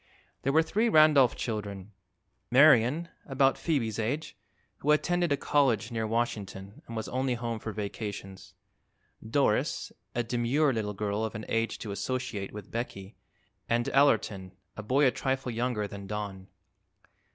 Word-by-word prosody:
There 135 - +1
were 160 +3 +4
three 215 +8 +1
Randolph 155 - +6
children: 105 -3 -5 0.6
Marion, 140 +4 +5 0.2
about 135 0 +3
Phoebe's 115 -10 -1
age, 140 +8 -2 0.4
who 145 - -4
attended 175 +2 +2
a 140 - +3
college 120 -7 +1
near 110 -1 -2
Washington 105 -4 -3
and 115 - -7
was 110 - -3
only 130 -1 -1
home 115 -1 -3
for 110 - -5
vacations; 100 -2 -6 0.7
Doris, 110 0 0 0.2
a 120 - +1
demure 125 +5 +1
little 105 -3 -2
girl 105 +1 -2
of 110 - -3
an 110 - -5
age 115 0 0
to 105 - -6
associate 105 -1 -3
with 105 -2 -9
Becky, 105 -4 -5 0.5
and 120 0 +1
Allerton, 110 -9 +2 0.2
a - - -6
boy 130 +7 +2
a 130 - +5
trifle 130 -1 -2
younger 115 -2 -1
than 100 0 -9
Don. 100 -2 -5
115 Hz, 145 wpm, -29 LUFS, 105-135 Hz, 0.7 s, Randolph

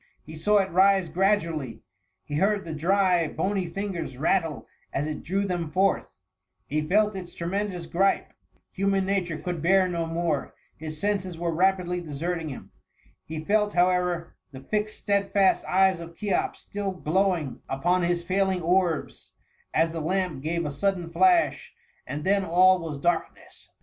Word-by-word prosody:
He 160 - -10
saw 210 +7 +2
it 195 -1 +1
rise 190 0 +4
gradu* 190 -1 +2
ally 135 -7 -4 0.3
— 90 +1 -50
he 145 - -3
heard 200 +3 +1
the 165 - -5
dry, 180 +1 +2
bony 190 +3 -1
fingers 175 -6 -4
rattle 160 0 0 0.3
as 140 - -1
it 155 -1 -4
drew 195 +4 -1
them 175 -4 -2
forth 190 +4 +1 0.6
^he 155 +1 -1
felt 210 +2 +3
its 180 -2 -8
tremendous 180 0 -3
gripe 190 +4 +1 0.4
—human 195 0 +1
nature 185 -5 -1
could 175 -1 -4
bear 185 +3 +4
no 170 -2 -2
more 165 -3 -2
— - - -36
^his 155 -1 -5
senses 190 +1 -2
were 170 0 -1
rapidly 180 0 +1
deserting 165 +1 -3
him; 135 - -9 0.5
he 155 0 -6
felt, 210 +1 +2
however, 180 -1 +1 0.2
the 130 -1 -10
fixed 210 +8 -2
stedfast 200 -1 +2
eyes 190 -1 +3
of 170 0 -10
Cheops 205 -3 -1
still 200 -1 -4
glow 185 +2 +1
ing 145 -6 -6
upon 175 +7 +1
his 175 0 0
failing 190 0 0
orbs, 175 -2 0 0.4
as 165 0 +2
the 165 -1 -4
lamp 180 -3 -1
gave 165 +3 -2
a 150 - -2
sudden 175 +3 -1
flash, 355 - +2 0.3
and 150 +1 -4
then 195 +2 +2
all 185 +1 +5
was 160 -4 -5
darkness 170 +4 -3
180 Hz, 165 wpm, -26 LUFS, 165-195 Hz, 0.6 s, all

